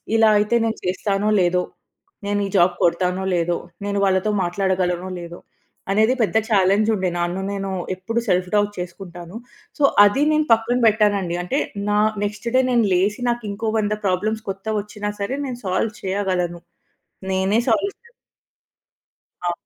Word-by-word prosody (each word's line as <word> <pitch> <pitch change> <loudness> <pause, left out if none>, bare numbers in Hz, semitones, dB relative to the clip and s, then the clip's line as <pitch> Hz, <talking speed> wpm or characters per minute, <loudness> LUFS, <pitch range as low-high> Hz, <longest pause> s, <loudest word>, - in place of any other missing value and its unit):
ఇలా 225 -1 +5
అయితే 210 +3 +1
నేను 225 0 -2
చేస్తానో 195 +3 0
లేదో, 180 0 +2 0.6
నేను 205 0 0
ఈ - - -6
జాబ్ 175 0 +4
కొడతానో 180 +2 +1
లేదో, 175 0 0 0.3
నేను 200 0 -1
వాళ్ళతో 190 +2 +1
మాట్లాడగలనో 185 0 -1
లేదో, 170 0 -9 0.5
అనేది 220 +5 +3
పెద్ద 220 - +1
చాలెంజ్ 200 +2 +3
ఉండే. 190 -2 -1
నన్ను 175 +2 -1
నేను 195 -1 -3 0.3
ఎప్పుడు 225 +6 -2
సెల్ఫ్ 180 0 +1
డౌట్ 205 0 +2
చేసుకుంటాను. 175 +1 -8 0.4
సో, - - +1 0.2
అది 235 +8 +2
నేను 305 0 +1
పక్కన 225 +2 +1
పెట్టానండి. 205 -5 +2
అంటే, 265 +11 -1 0.3
నా 210 - +3 0.3
నెక్స్ట్ 210 +2 -5
డే 260 - +6
నేను 235 -2 +3
లేసి 200 +6 0
నాకు 240 0 -4
ఇంకో 220 +2 -3
100 210 0 0
ప్రాబ్లమ్స్ 215 +4 -1
కొత్తగా 195 +3 -4
వచ్చినా 210 0 -5
సరే, 250 +7 -2
నేను 245 -2 -6
సాల్వ్ 190 +4 0
చేయగలను. 185 -3 -1 0.7
నేనే 190 +3 +2
సాల్వ్. 315 - +1
చే 470 0 -22 1.4
ఆ! - - +1
200 Hz, 150 wpm, -21 LUFS, 180-215 Hz, 1.4 s, డే